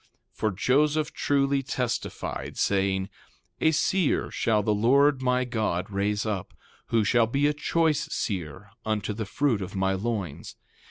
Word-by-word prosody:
3:6 - - -40
For 110 - +1
Joseph 150 +9 +1
truly 140 -1 +1
testified, 125 -3 -4
saying: 95 -1 +1 0.5
A 160 - +4
seer 165 +1 +1
shall 105 -2 +1
the 105 - +2
Lord 135 +6 +4
my 125 0 +1
God 110 -6 -2
raise 100 +2 0
up, 105 -4 -4 0.3
who 115 -2 +2
shall 115 +2 +3
be 140 +5 +1
a 150 - +3
choice 155 0 0
seer 85 - -4
unto 110 -1 -1
the 110 +1 -4
fruit 120 -1 0
of 95 +1 -6
my 95 0 +1
loins. 100 -6 -4
115 Hz, 150 wpm, -26 LUFS, 100-140 Hz, 0.5 s, A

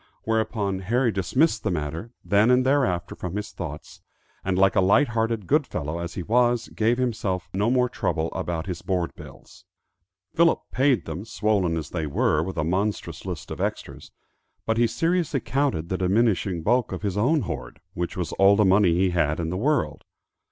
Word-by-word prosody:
Whereupon 110 -3 -1
Harry 120 +6 +1
dismissed 110 - +1
the 105 - -1
matter 80 +5 -3 0.2
then 105 +3 +4
and 125 0 +4
thereafter 130 -11 +1
from 90 +1 -6
his 105 - -4
thoughts, 75 -4 -8 0.4
and, 95 -1 -1
like 95 0 +4
a - - +4
light 100 +10 +4
hearted 115 -3 -1
good 145 - +2
fellow 75 +3 -4
as 85 0 -5
he 90 - -4
was, 120 +3 +2
gave 115 +2 +1
himself 105 -7 -2
no 100 +4 +1
more 125 0 +3
trouble 85 -9 -2
about 85 -1 -3
his 90 -3 -5
board 90 -3 -1
bills. - - -14 0.7
Philip 165 0 +4
paid 130 -1 +2
them, 95 - -5
swollen 105 -6 0
as 80 - -5
they 80 -3 -2
were 75 +1 +1
with 95 +3 -5
a - - +1
monstrous 95 +6 -2
list - - -6
of - - -5
extras; - - -4 0.6
but 110 0 0
he 120 - +4
seriously 165 +2 0
counted 115 - -1
the 95 - -2
diminishing 95 -3 +1
bulk 120 +4 +2
of 95 +2 -5
his 100 -3 -1
own 135 +9 +2
hoard, 70 - -6
which 85 +1 -4
was 90 -2 -3
all 100 +1 +6
the 105 0 +3
money 95 -2 +4
he 90 +1 +2
had 80 -3 +1
in 80 -1 -2
the - - -2
world. 145 +8 0
100 Hz, 185 wpm, -25 LUFS, 90-120 Hz, 0.7 s, all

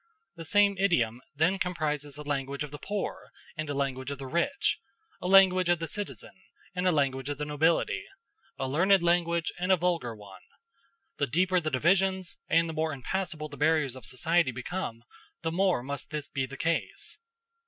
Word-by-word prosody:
The 165 -1 -8
same 200 +3 +4
idiom 125 - +2
then 175 +6 +2
comprises 150 -5 -2
a 150 - -7
language 140 0 -2
of 150 - -7
the 145 - -8
poor 205 -1 -4 0.3
and 155 -2 -4
a 145 - -2
language 135 -1 -2
of 140 - -4
the 135 - -7
rich 170 - 0 0.4
a 180 - -2
language 185 -2 +6
of 175 - +4
the 165 0 -4
citizen 145 - -6 0.4
and 180 0 0
a - - +5
language 135 -3 0
of 145 - -3
the 150 - -3
nobility 160 - +1 0.5
a 135 - -2
learned 180 +7 +4
language 170 -1 +2
and 180 +2 +1
a 190 - +6
vulgar 165 -9 0
one. 100 -2 -13 0.8
The 140 - +1
deeper 180 +7 +2
the 155 -2 -2
divisions, 190 +6 +1
and 165 +1 +4
the 160 - -4
more 155 0 -1
impassable 155 +3 -3
the 145 -1 -11
barriers 150 -4 +2
of 130 - -8
society 160 +4 +2
become, 125 -1 -5 0.4
the 165 - 0
more 180 -6 +2
must 140 +1 -5
this 150 -1 -4
be 135 -1 -2
the 135 +1 -9
case. 165 +3 -2
155 Hz, 185 wpm, -29 LUFS, 140-180 Hz, 0.8 s, language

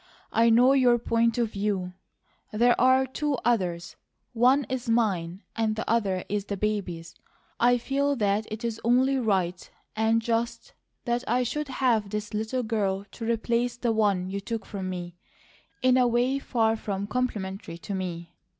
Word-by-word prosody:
I 230 +1 +4
know 245 +4 +6
YOUR 250 -3 +4
point 230 0 +1
of 235 -3 0
view; 195 -3 -2 0.6
there 240 +3 +4
are 260 +1 +5
two 290 +2 -2
others, 180 -8 0 0.4
one 255 +4 +4
is 255 -2 -4
mine, 195 -6 0
and 220 -1 0
the 220 - -4
other 200 -5 0
is 205 -1 -2
the 200 -1 -4
baby's. 185 -6 -3 0.5
I 245 +1 +4
feel 280 +3 0
that 210 -2 0
it 220 +2 -5
is 225 -1 -3
only 260 +3 +3
right 185 -6 -1 0.3
and 220 +1 +2
just 235 - -2 0.3
that 240 0 0
I 250 +1 +2
should 295 +5 -3
have 245 -6 +1
this 210 0 -4
little 220 +4 -2
girl 200 -3 -1
to 230 -1 -5
replace 235 +1 0
the 240 -1 0
one 205 -4 +1
you 200 - -2
took 225 +2 -5
from 190 -2 -5
me, 175 -1 -6 0.7
in 255 0 +5
a 250 -1 +4
way 245 +3 +1
far 225 -4 +1
from 200 -2 -4
complimentary 205 -7 -3
to 200 +4 -7
me. 175 -3 -5
225 Hz, 165 wpm, -26 LUFS, 200-245 Hz, 0.7 s, know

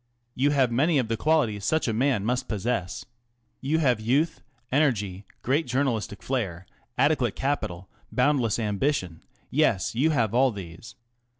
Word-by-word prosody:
You 135 +4 +2
have 135 -4 +2
many 145 +7 +2
of 125 -4 0
the 115 - +1
qualities 115 -7 +1
such 155 +8 +1
a 115 - 0
man 120 -3 +1
must 125 +2 -1
possess. 105 -3 -2 0.5
You 145 +4 0
have 125 -8 +2
youth, 135 +9 0 0.3
en 140 +4 +4
ergy, 105 -9 -1 0.2
great 145 +6 +1
jour 130 +3 +1
nalistic 110 -7 -3
fiairt\ 95 -9 -3 0.3
adequate - - +2
capital, 100 -10 -2 0.2
boundless 130 -7 +2
ambi 115 +6 0
tion 90 -9 -4
ŌĆö 80 - -17 0.3
> - - -40
yes, 90 -3 +2
you 135 +8 +2
have 115 -8 +1
all 130 +2 +4
these. 100 +2 -10
120 Hz, 170 wpm, -26 LUFS, 105-140 Hz, 0.5 s, en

